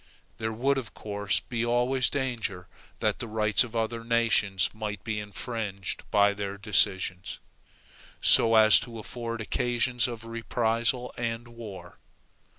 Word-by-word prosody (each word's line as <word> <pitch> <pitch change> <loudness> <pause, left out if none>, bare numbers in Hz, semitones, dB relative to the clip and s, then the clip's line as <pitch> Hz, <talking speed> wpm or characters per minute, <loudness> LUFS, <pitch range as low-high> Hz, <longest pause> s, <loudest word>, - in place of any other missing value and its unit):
There 110 0 -2
would 135 +5 +1
of 125 - -9
course 100 -2 -1
be 120 -2 -3
always 125 +2 +2
danger 120 -9 -3 0.3
that - - 0
the 115 - -4
rights 110 -1 +2
of 120 -1 -9
other 115 0 -2
nations 115 -5 +2
might 105 -1 -5
be 110 -2 -2
infringed 105 -2 -5
by 100 0 +4
their 100 0 -5
decisions, 95 -3 0 0.8
so 115 0 +7
as 110 -2 +7
to 115 -1 -8
afford 115 +1 -5
occasions 120 +2 0
of 115 -2 -7
reprisal 115 +2 -1
and 115 0 -3
war. 115 -5 -10
115 Hz, 135 wpm, -27 LUFS, 105-120 Hz, 0.8 s, so